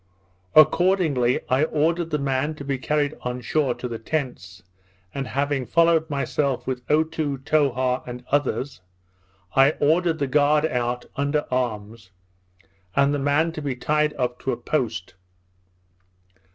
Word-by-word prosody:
Accordingly, 155 -5 +4
I 130 +3 +2
ordered 165 +2 0
the 150 - 0
man 140 +2 -1
to 140 - -9
be 135 -1 -2
carried 145 +2 0
on 125 0 -4
shore 130 +1 0
to 120 +1 -5
the 115 -2 -6
tents, 120 - -4 0.5
and 135 -2 -4
having 140 -2 -1
followed 165 -1 +3
myself, 140 -1 -1
with 130 -1 -3
Otoo, 155 -2 0
Towha, 130 -3 +1
and 125 0 -8
others, 140 -5 -1 0.7
I 135 +3 +5
ordered 165 +3 +2
the 145 - 0
guard 150 +2 +3
out, 125 -3 -2
under 145 +1 0
arms, 110 -4 -3 0.9
and 140 +1 +3
the 145 - -1
man 145 +4 +1
to 160 - -7
be 140 -3 -3
tied 150 +4 0
up 125 -2 -2
to 135 - -2
a - - -2
post. 115 - -2
140 Hz, 140 wpm, -23 LUFS, 125-150 Hz, 0.9 s, I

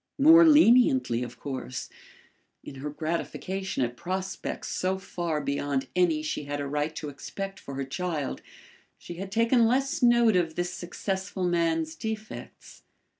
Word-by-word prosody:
More 320 +4 +8
leniently 235 - +5
of 120 -1 -6
course. 130 -3 -5 0.8
In - - -9
her 150 - -3
gratification 170 +3 -3
at 120 0 -2
prospects 185 +6 -4
so 185 +1 -1
far 170 -4 -3
beyond 140 -1 -2
any 170 -4 +2
she 150 -1 -3
had 145 0 -3
a 145 - -2
right 150 +2 -2
to 150 - -5
expect 195 +7 -6
for 140 - -8
her 135 0 -3
child, 150 +1 -3 0.6
she 170 - -9
had 195 +1 -6
taken 230 +2 +4
less 270 +3 +1
note 240 -3 +5
of 165 -3 +1
this 175 0 -2
successful 190 +1 -4
man's 165 -2 +1
defects. 220 +3 -7
175 Hz, 145 wpm, -27 LUFS, 145-195 Hz, 0.8 s, More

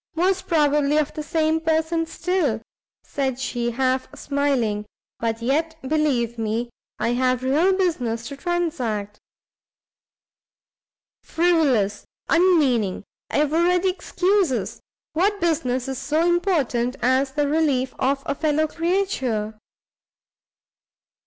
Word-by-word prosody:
"Most 370 +3 +1
probably 295 -2 +2
of 300 -2 0
the 305 - -4
same 315 +1 0
person 325 +1 0
still!" 325 -10 -1 0.4
said 265 -3 -2
she, 240 -3 -2
half 255 +1 0
smiling, 265 -8 -1 0.3
"but 230 0 -2
yet 315 +6 0
believe 260 -6 0
me, 225 +2 -2 0.3
I - - 0
have 255 +1 +1
real 310 +9 +3
business 250 -12 -1
to 280 - -7
transact." 275 - -2 2.0
"Frivolous, 285 - +1 0.2
unmeaning, 285 - +3 0.3
ever 300 +3 +1
ready 360 +2 +3
excuses! 365 -4 0 0.3
what 400 +6 +1
business 285 -7 0
is 265 -1 -4
so 310 +3 +1
important 295 -9 +1
as 260 +2 +2
the 295 0 +1
relief 285 -4 +1
of 275 +1 0
a - - 0
fellow 310 +1 +1
creature?" 310 - -1
290 Hz, 105 wpm, -23 LUFS, 245-330 Hz, 2.0 s, real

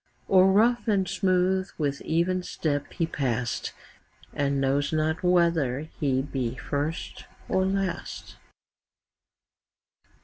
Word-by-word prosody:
O'er 190 -1 +7
rough 235 +5 +3
and 195 -3 +2
smooth 185 0 +1
with 140 -3 -1
even 175 +3 0
step 145 -5 -2
he 165 - 0
pass'd, 125 -6 -2 0.7
10 145 - 0
And 140 0 0
knows 135 +1 +1
not 155 +1 0
whether 170 -7 +2 0.2
he 135 -3 +1
be 130 -4 -3
first 145 +5 -4 0.2
or 190 0 +1
last. 195 -2 -3
165 Hz, 110 wpm, -26 LUFS, 140-185 Hz, 0.7 s, O'er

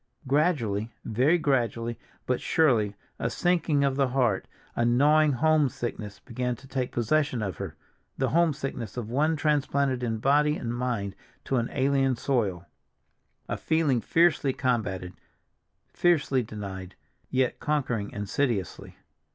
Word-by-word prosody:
Gradually, 130 - +1
very 130 +10 +3
gradually, 120 -6 0 0.3
but 125 -1 0
surely, 115 -10 +2 0.2
a 115 - 0
sinking 165 -1 +1
of 135 -1 +1
the 135 -1 +3
heart, 125 -6 +1 0.3
a 120 - +1
gnawing 145 +5 +4
homesickness 130 -7 0
began 125 0 -3
to 135 +3 -16
take 130 -2 -2
possession 125 0 +1
of 95 -5 -4
her—the 130 - -6
homesickness 140 - -1
of 115 -2 -4
one 155 +5 +2
transplanted 140 -3 +1
in 115 -2 -1
body 150 +5 +3
and 120 0 -4
mind 120 -6 -2 0.3
to 135 - 0
an 120 0 0
alien 135 -1 +2
soil; 105 -9 -1 0.8
a - - -2
feeling 155 -7 +1
fiercely 165 -4 +3
combated, 110 -9 -1 0.8
fiercely 150 -7 +2
denied, 100 -4 -7 0.3
yet 130 -1 0
conquering 125 -9 -1
insidiously. 105 - -2
130 Hz, 125 wpm, -27 LUFS, 115-145 Hz, 0.8 s, gnawing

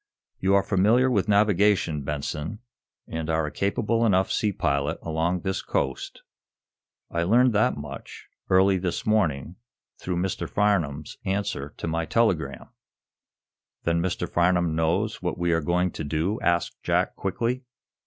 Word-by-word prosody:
"You 95 +1 +3
are 100 - +4
familiar 110 +7 +3
with 105 -3 +1
navigation, 100 -6 +3
Benson, 75 +6 -4 0.5
and 80 0 -4
are 80 -1 +1
a 75 - -4
capable 105 - 0
enough 95 -4 +3
sea 105 - +1
pilot 70 -3 0
along 85 +2 -1
this 95 +2 -2
coast. 65 -1 -3 0.9
I 85 - 0
learned 120 +7 +4
that 105 -7 +2
much, 75 -1 -9 0.2
early 95 0 +4
this 90 -1 -3
morning, 85 -7 0 0.4
through 90 -1 -3
Mr. 90 +1 -2
Farnum's 85 -8 0
answer 95 -7 -2
to - - -4
my 80 0 -1
telegram." 100 -6 0 1.1
"Then 85 0 +1
Mr. 90 0 -2
Farnum 85 -1 +2
knows 85 +7 0
what 90 -1 -2
we 85 0 0
are 80 - +1
going 90 +3 +1
to - - -6
do?" 80 +8 -1
asked 85 0 0
Jack, - - 0
quickly. 115 +6 -2
90 Hz, 145 wpm, -25 LUFS, 80-100 Hz, 1.1 s, are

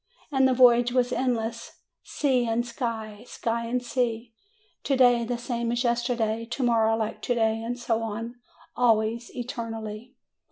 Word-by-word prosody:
And 265 -2 +4
the 260 - +2
voyage 245 -1 +5
was 250 0 +1
endless; 230 -3 -2 0.3
sea 255 -5 0
and 230 +1 0
sky, 225 -3 -5
sky 230 0 -2
and 250 +1 -1
sea; 240 -2 -2 0.5
to 275 - 0
day 245 -2 +5
the 240 +1 -2
same 235 -1 -2
as 240 +1 0
yesterday, 235 -2 0
to 240 +3 -4
morrow 225 -2 +3
like 220 -1 -3
to 245 - 0
day, 225 -1 +1
and 240 +2 -4
so 230 -2 -1
on, 225 +1 -4 0.4
always, 230 -1 +2
eternally. 230 -1 -6
235 Hz, 155 wpm, -26 LUFS, 225-245 Hz, 0.5 s, voyage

